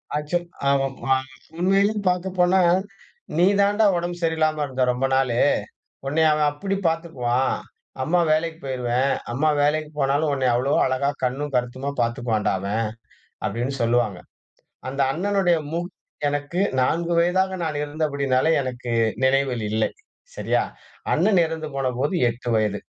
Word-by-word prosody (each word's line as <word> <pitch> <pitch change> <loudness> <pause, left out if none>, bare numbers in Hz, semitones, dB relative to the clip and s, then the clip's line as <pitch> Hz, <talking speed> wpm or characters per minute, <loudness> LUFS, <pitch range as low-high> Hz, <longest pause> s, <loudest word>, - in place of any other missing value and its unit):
Actual 170 +4 -1 0.2
அ - - +5 0.4
ம - - -4 0.5
உண்மையிலே 195 +3 +3 0.2
பாக்க 180 +1 -1
போனா, 180 +2 +4 0.8
"நீ 175 - +5 0.2
தான்டா 205 +2 +3
உடம்பு 175 0 -4
சரியில்லாம 155 -2 +1
இருந்த 130 -2 -1
ரொம்ப 125 +2 -1
நாளு. 125 -3 +1 0.7
உன்னைய 160 +3 +3
அவன் 150 -1 +2
அப்படி 195 +7 -3
பாத்துக்குவான். 135 -7 0 0.5
அம்மா 175 +5 +2
வேலைக்கு 160 +1 0
போய்ருவேன். 130 0 0 0.2
அம்மா 145 +6 +1
வேலைக்கு 150 +1 +1
போனாலும் 145 +2 +1
உன்னைய 130 -2 +1
அவ்வளோ 130 +4 +1
அழகா, 130 +2 0
கண்ணும் 135 +3 -2
கருத்துமா 125 +3 -1
பார்த்துக்குவான்டா 115 -2 0
அவன்." 105 +4 -1 0.6
அப்டின்னு 125 +4 -2
சொல்வாங்க. 115 -5 +1 0.7
அந்த 135 +2 -4
அண்ணனுடைய 185 0 +1
முகம் 175 +2 -3 0.4
எனக்கு 145 +5 -2 0.2
4 170 +6 +1
வயதாக 190 +2 +2
நான் 155 -2 -2
இருந்தபடியினாலே, 145 -2 0
எனக்கு 125 -2 -5 0.3
நினைவில் 130 -3 +1
இல்லை. 110 +1 +1 0.5
சரியா? - - +1 0.5
அண்ணன் 200 -4 +3
இறந்து 160 -1 -5
போனபோது 135 +3 -1
8 120 +1 -5
வயது. 105 -2 +1
145 Hz, 130 wpm, -23 LUFS, 125-170 Hz, 0.8 s, அ